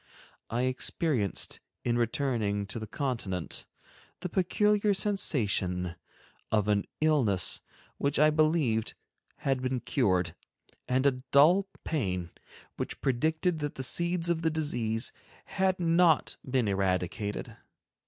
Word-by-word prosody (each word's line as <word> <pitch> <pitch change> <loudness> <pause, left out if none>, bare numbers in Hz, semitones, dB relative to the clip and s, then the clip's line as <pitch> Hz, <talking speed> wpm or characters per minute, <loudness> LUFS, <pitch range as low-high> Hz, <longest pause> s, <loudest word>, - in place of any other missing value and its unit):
I 120 +2 0
experienced, 130 - 0 0.2
in 120 - +1
returning 115 -4 0
to - - -4
the 110 - -6
Continent, 110 - -3 0.5
the 180 - -3
peculiar 205 +3 +2
sensation 100 - 0 0.6
of 105 -2 +2
an 105 -1 +2 0.2
illness 120 - +3 0.4
which 140 0 +1
I 155 +1 +5
believed 155 -8 +1 0.4
had 135 -2 -1
been 130 0 -1
cured, 95 - +1 0.5
and 130 +2 +1
a 140 - +6 0.2
dull 175 +8 +6 0.2
pain 90 - -2 0.5
which - - -4
predicted 155 +6 +1
that 145 -1 -3
the 130 - -4
seeds 170 +5 +1
of 170 -1 +1
the 165 - +2
disease 120 -8 -1 0.3
had 190 -1 0
not 170 -2 +3
been 125 -4 +1
eradicated. 95 +1 -1
130 Hz, 115 wpm, -29 LUFS, 105-160 Hz, 0.6 s, a